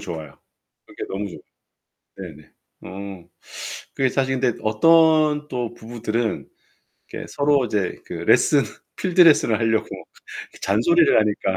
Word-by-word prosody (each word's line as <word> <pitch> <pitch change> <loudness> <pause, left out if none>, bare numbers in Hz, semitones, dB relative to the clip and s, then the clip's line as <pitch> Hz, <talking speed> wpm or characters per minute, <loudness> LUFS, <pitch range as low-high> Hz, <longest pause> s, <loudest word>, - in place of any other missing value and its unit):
좋아요. 80 -4 -8 0.5
그게 - - -11
너무 100 +1 -4
좋아. - - -10 0.8
네네. - - -11 0.3
어. 95 -1 -9 0.7
그게 135 -1 +1
사실 135 0 -1
근데 125 -3 0
어떤 155 +5 +3
또 120 -3 -4
부부들은 115 0 -4 0.7
이렇게 - - -6
서로 140 -2 +1
이제 105 -4 -2
그 - - -10
레슨 145 -2 +3 0.3
필드 185 -1 0
레슨을 145 -9 +4
하려고 110 -1 0 0.8
잔소리를 150 - +3
하니까. 100 -3 -1
120 Hz, 260 characters per minute, -22 LUFS, 105-150 Hz, 0.8 s, 레슨을